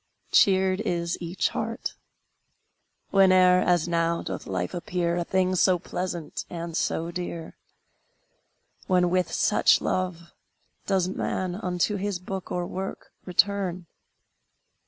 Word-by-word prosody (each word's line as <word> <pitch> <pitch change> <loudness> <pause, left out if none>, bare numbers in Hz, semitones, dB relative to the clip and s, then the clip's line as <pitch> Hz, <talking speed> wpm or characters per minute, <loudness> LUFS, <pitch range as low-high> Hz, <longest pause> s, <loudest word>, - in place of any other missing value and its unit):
Cheered 190 0 +4
is 170 -1 -1
each 175 +2 -1
heart. - - -4 1.2
Whene'er, 185 -2 +6
as 175 -2 +2
now, 170 0 0
doth - - -5
life 90 -2 -2
appear 175 0 -1
A 175 - 0
thing 185 +1 +1
so 185 0 +4
pleasant 175 -2 -4
and 170 -1 -5
so 165 0 -1
dear? 170 -2 -6 1.3
When, 180 -1 +3
with 185 0 +1
such - - +4
love, 180 -2 -2 0.5
Does 190 -2 +2
man 185 -1 -2
unto 180 +1 -1
his 200 -1 -2
books 185 +1 -6
or 180 -1 -1
work 190 +2 -6
return? 185 -1 +1
180 Hz, 115 wpm, -26 LUFS, 170-185 Hz, 1.3 s, Whene'er